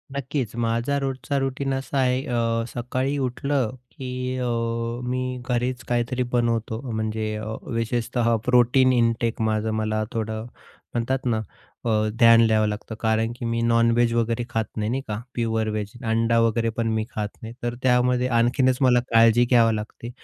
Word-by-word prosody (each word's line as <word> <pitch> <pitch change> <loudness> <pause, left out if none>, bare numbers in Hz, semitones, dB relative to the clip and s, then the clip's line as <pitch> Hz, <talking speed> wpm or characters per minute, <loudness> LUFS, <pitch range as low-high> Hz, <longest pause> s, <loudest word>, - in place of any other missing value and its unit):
नक्कीच. 135 -4 -3
माझा 120 +4 0
रोजचा 135 +1 -2
रुटीन 135 0 -2
असा 135 +1 -3
आहे 130 0 +2
अ, 115 -2 0
सकाळी 130 +3 -2
उठलं 135 -1 -1 0.2
की 130 0 -4
अ, 125 - -2 0.6
मी 125 0 -2
घरीच 125 0 -1
काहीतरी 120 +1 0
बनवतो 115 -2 0
म्हणजे 110 0 -2
अ, 110 +1 -5 0.2
विशेषतः 115 0 0
प्रोटीन 125 +1 +4
इंटेक 115 -1 +1
माझं 110 0 0
मला 110 0 0
थोडं 110 0 -3 0.5
म्हणतात 130 +3 -1
ना 115 -3 +1 0.4
अ, - - +1 0.3
ध्यान 115 -1 +7
द्यावं 110 -1 +3
लागतं. 105 +1 -5
कारण 110 0 +1
की 120 - -6
मी 115 0 -1
नॉनव्हेज 115 0 +3
वगैरे 115 0 0
खात 115 -1 -1
नाही 105 0 -1
नाही 135 +2 -1
का, 105 -1 -3
प्युअर 115 -2 0
वेज 105 -1 -3
अंडा 115 +1 +2
वगैरे 115 0 +2
पण 115 -1 0
मी 110 0 0
खात 105 -2 -3
नाही, 115 0 -7
तर 120 0 -2
त्यामध्ये 125 0 +3
आणखीनच 130 +2 +3
मला 125 -2 +5
काळजी 115 +1 +5
घ्यावी 115 -3 +5
लागते. 110 +2 -6
115 Hz, 155 wpm, -24 LUFS, 115-125 Hz, 0.6 s, ध्यान